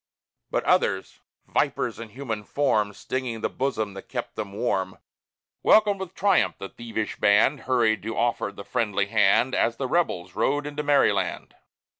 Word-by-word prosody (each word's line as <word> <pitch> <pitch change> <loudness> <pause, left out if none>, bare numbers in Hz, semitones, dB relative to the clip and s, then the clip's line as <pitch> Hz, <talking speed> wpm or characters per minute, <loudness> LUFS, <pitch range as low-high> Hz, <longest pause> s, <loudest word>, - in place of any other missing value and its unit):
But - - -1
others - - +1 0.3
vipers - - -1
in 115 -1 -7
human 115 -3 -5
form 110 -5 +1
Stinging 120 +1 -4
the - - -1
bosom 110 -6 -2
that 95 - -10
kept - - -5
them 105 -2 -5
warm 95 -3 -1 0.6
Welcomed 210 -2 +4
with 190 -1 -7
triumph 200 -1 +2
the 95 - -7
thievish 115 -2 -5
band, 105 +8 +4
Hurried 115 -4 +3
to 115 +2 -5
offer 120 -3 0
the 100 0 -10
friendly 105 -5 0
hand, 105 +4 +3
As 115 - +1
the 135 - -2
Rebels 90 - 0
rode 145 +8 0
into 150 0 -4
Maryland. 120 -10 +1
115 Hz, 155 wpm, -25 LUFS, 105-140 Hz, 0.6 s, Welcomed